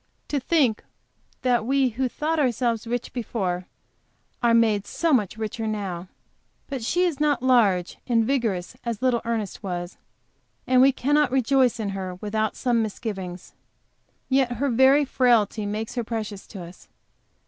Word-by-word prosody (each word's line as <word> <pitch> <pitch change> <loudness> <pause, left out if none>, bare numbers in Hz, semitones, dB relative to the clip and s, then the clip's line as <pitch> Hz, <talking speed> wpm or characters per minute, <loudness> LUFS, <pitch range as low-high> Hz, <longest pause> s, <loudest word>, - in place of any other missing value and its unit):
To 290 - 0
think 260 -5 +1 0.6
that 245 -3 +2
we, 265 +2 +2
who 255 +3 -2
thought 315 +5 -1
ourselves 240 -4 0
rich 240 +1 -3
before 190 -7 -3 0.7
are 235 -1 +4
made 215 -3 +2
so 335 -2 0
much 215 -4 +1
richer 220 0 -3
now! 190 -5 -4 0.6
But 270 -4 -5
she 350 +10 +1
is 335 -6 0
not 290 -4 +1
large 210 -9 +3
and 230 -3 +3
vigorous, 225 -7 -1
as 235 0 -4
little 250 -2 +2
Ernest 225 -4 -3
was, 175 -3 -5 0.7
and 255 -1 +4
we 270 +1 +7
cannot 290 +2 +2
rejoice 260 -1 +2
in 210 -2 -2
her 190 -2 -4
without 215 +3 -2
some 240 -3 +1
misgiving. 195 -4 -4 0.9
Yet 260 -2 +2
her 265 +3 -1
very 265 +4 +5
frailty 230 -5 +2
makes 215 +2 -4
her 245 -1 -2
precious 215 -3 -5
to 190 -5 -8
us. 175 +2 -13
230 Hz, 150 wpm, -24 LUFS, 210-260 Hz, 0.9 s, we